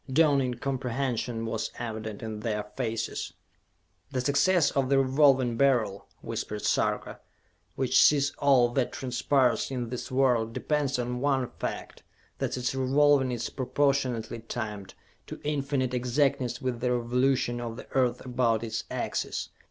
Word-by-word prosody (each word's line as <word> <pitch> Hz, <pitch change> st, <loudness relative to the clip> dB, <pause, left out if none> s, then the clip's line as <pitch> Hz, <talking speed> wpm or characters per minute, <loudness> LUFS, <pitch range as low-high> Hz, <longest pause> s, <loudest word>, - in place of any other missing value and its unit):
Dawning 140 Hz, -4 st, +3 dB
comprehension 125 Hz, -2 st, -2 dB
was 115 Hz, -1 st, -2 dB
evident 110 Hz, -3 st, -5 dB
in 110 Hz, -1 st, -5 dB
their 105 Hz, -2 st, -2 dB
faces. 115 Hz, -3 st, -3 dB, 0.8 s
"The 130 Hz, -, -2 dB
success 145 Hz, +6 st, +3 dB
of 135 Hz, -2 st, 0 dB
the 140 Hz, -, +4 dB
Revolving 135 Hz, -3 st, +3 dB
Beryl," 120 Hz, -8 st, +2 dB, 0.2 s
whispered 105 Hz, 0 st, -4 dB
Sarka, -, -, 0 dB, 0.6 s
"which 130 Hz, -2 st, +3 dB
sees 145 Hz, -1 st, +4 dB
all 135 Hz, -4 st, +5 dB
that 125 Hz, 0 st, -1 dB
transpires 130 Hz, -1 st, +1 dB
in 125 Hz, -3 st, -3 dB
this 125 Hz, 0 st, -5 dB
world, 125 Hz, -4 st, +2 dB
depends 145 Hz, -1 st, 0 dB
on 125 Hz, 0 st, -2 dB
one 135 Hz, -3 st, +1 dB
fact: -, -, -5 dB, 0.4 s
that -, -, -2 dB
its 125 Hz, 0 st, -1 dB
revolving 135 Hz, 0 st, +3 dB
is 120 Hz, -1 st, -3 dB
proportionately 130 Hz, -4 st, 0 dB
timed 110 Hz, -4 st, -6 dB, 0.3 s
to -, -, -8 dB
infinite 140 Hz, -3 st, -1 dB
exactness 125 Hz, 0 st, 0 dB
with 125 Hz, -2 st, -2 dB
the 125 Hz, +1 st, 0 dB
revolution 125 Hz, 0 st, +1 dB
of 115 Hz, -1 st, -5 dB
the -, -, -8 dB
Earth 125 Hz, -2 st, +1 dB
about 120 Hz, -3 st, +1 dB
its 110 Hz, -1 st, -3 dB
axis! -, -, -3 dB
125 Hz, 135 wpm, -28 LUFS, 120-135 Hz, 0.8 s, all